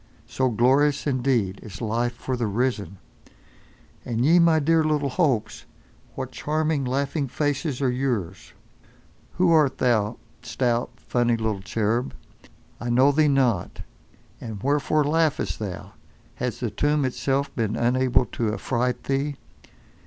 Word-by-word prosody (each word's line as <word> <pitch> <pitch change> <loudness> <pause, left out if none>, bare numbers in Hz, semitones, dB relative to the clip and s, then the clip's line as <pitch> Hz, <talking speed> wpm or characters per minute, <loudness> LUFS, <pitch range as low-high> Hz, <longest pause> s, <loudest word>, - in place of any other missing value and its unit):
So 130 -1 0
glorious, 135 +5 +2
indeed, 125 -8 0
is 105 - -10
life 120 +1 -1
for 130 +2 -3
the 120 -2 -1
risen! 105 -2 -2 1.1
And 120 +1 -1
ye 170 +4 +6
my 170 -1 +5
dear 160 +2 +3
little 150 -3 0
Hopes! 130 -10 0 0.5
What - - -5
charming 155 -2 -1
laughing 140 +3 -1
faces 145 0 -2
are 130 - +2
yours! 120 -9 -3 0.8
Who 180 -1 +2
art 150 -5 +3
thou, 110 -3 +1 0.2
stout, 120 -1 -1
funny 120 -1 0
little 110 -3 -2
cherub? 115 +4 -1 0.6
I 120 - -4
know 130 +4 +5
thee 150 +1 +3
not. 130 -10 +1 0.6
And 110 -4 -7
wherefore 145 +2 +2
laughest 150 - 0
thou? 100 -4 -6 0.5
Has 125 0 -3
the 120 -4 -2
tomb 145 +6 +1
itself 135 +2 -1
been 110 -2 -1
unable 125 +1 +2
to 110 -1 -2
affright 125 0 -1
thee? 140 +1 -1
130 Hz, 130 wpm, -24 LUFS, 115-145 Hz, 1.1 s, ye